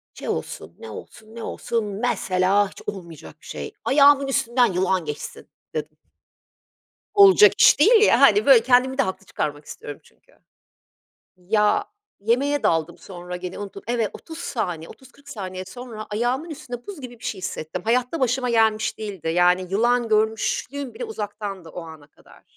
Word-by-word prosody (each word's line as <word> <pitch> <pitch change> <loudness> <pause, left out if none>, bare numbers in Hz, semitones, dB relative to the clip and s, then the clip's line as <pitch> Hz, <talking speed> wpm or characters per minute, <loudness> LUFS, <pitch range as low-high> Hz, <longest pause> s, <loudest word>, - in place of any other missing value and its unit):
şey - - -8
olsun, 85 - -5
ne 110 - -9
olsun, 220 - -12
ne 230 - -7
olsun 230 -2 -3
mesela 200 -2 +1
hiç - - -14
olmayacak 170 - -8
bir - - -18
şey, 70 -1 -7
ayağımın 280 0 +5
üstünden 240 -5 +1
yılan 185 -1 0
geçsin 150 -1 -7 0.3
dedim. 155 0 -5 1.2
Olacak 400 +1 +7
iş - - +7
değil, 435 +7 +6
ya, - - +5
hani, 415 - +6
böyle 475 -2 +7
kendimi 260 +1 +3
de 275 - +4
haklı 190 -1 -5
çıkarmak 145 -4 -4
istiyorum 145 -1 -9
çünkü. - - -26 1.1
Ya, 210 - +1 0.4
yemeğe 270 +7 +1
daldım 165 +1 0
sonra 180 -1 -8
gene 180 0 -7
unuttum. 200 -1 -8
Evet, 230 -3 0
30 320 -1 -10
saniye, 180 - -4
30-40 280 +2 -17
saniye 185 -3 -6
sonra 225 +1 -9
ayağımın 245 +9 -1
üstünde 255 -6 -8
buz 395 -7 -8
gibi 245 -3 -10
bir - - -15
şey 200 - -3
hissettim. 160 -4 -5
Hayatta 250 +6 0
başıma 250 0 0
gelmiş 220 -2 +2
değildi. 195 -7 -6
Yani, 180 +2 +3
yılan 235 +3 +2
görmüşlüğüm 225 +5 -1
bile 485 - -5
uzaktandı 205 - -6
o 175 - -8
ana 160 -2 -12
kadar. - - -21
220 Hz, 155 wpm, -23 LUFS, 185-255 Hz, 1.2 s, Olacak